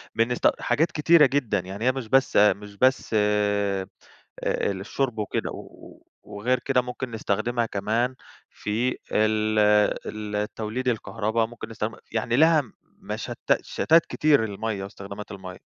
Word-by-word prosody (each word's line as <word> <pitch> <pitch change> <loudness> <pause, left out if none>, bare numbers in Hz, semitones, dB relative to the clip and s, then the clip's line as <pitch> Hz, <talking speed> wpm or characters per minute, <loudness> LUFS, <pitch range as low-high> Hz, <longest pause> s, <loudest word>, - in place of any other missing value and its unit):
بنست 115 +2 +3
حاجات 160 +2 +1
كتيرة 155 +1 +5
جدًا، 130 -7 +1
يعني 95 +5 -6
هي 130 - +5
مش 130 -3 -6
بس 135 +3 +2
مش 105 0 +3
بس 130 +3 +2
آآ 105 -2 +1 0.9
للشرب 115 +5 -3
وكده، 105 - -2
و - - -12 0.2
وغير 105 +5 -1
كده 125 +1 +1
ممكن 125 +1 -5
نستخدمها 115 +2 -1
كمان 115 +5 -1 0.4
في 115 +5 -2 0.2
ال 110 0 +2 0.8
ال 105 0 -2
توليد 115 +4 -3
الكهربا، 110 -1 0
ممكن 115 -1 -9
نستخدمها 110 0 -5
يعني 115 +1 0
ليها 160 0 +5 0.2
مشت - - -7 0.2
شتات 165 +1 +3
كتير 150 -6 +3
المَيَّة 105 -1 -3
واستخدامات 100 +1 -9
المَيَّة. 95 -2 -9
110 Hz, 130 wpm, -25 LUFS, 105-125 Hz, 0.9 s, كتيرة